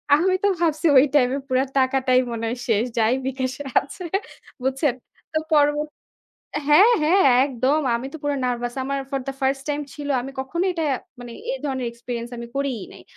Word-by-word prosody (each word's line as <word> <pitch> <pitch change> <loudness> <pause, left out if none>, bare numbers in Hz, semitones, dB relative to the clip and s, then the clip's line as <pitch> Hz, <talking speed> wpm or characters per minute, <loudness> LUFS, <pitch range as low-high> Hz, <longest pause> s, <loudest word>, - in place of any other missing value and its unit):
আমি 370 +5 +2
তো - - +5
ভাবছি 330 0 +1
ওই 260 - +8
time 250 -3 +4
এ - - -3
পুরা 260 0 +2 0.2
টাকাটাই 260 -1 +3
মনে 230 0 -4
হয় 245 - -3
শেষ, 220 -1 +2
যাই 225 +2 +3
বিকাশে 260 +1 -3 0.2
আছে, 360 +6 -9 0.6
বুঝছেন? 265 0 +1 0.4
তো 315 - +2
পরবত 295 0 +3 0.8
হ্যাঁ, 390 +11 +7
হ্যাঁ, 365 +6 +4 0.2
একদম। 270 +3 +1 0.2
আমি 250 +3 -5
তো - - -6
পুরা 290 -1 0
nervous। 240 0 -2
আমার 275 0 -2
for 275 -1 -1
the 270 - -3
first 270 0 0
time 295 0 -1
ছিল, 290 -1 -6
আমি 270 - -6
কখনোই 340 +8 -1
এটা 325 -2 -1 0.4
মানে 240 -1 -8 0.2
এই - - -2
ধরনের 260 -3 -2
experience 235 0 -6
আমি 235 - -6
করিই 265 -8 -2
নাই। - - -13
270 Hz, 180 wpm, -23 LUFS, 250-295 Hz, 0.8 s, ওই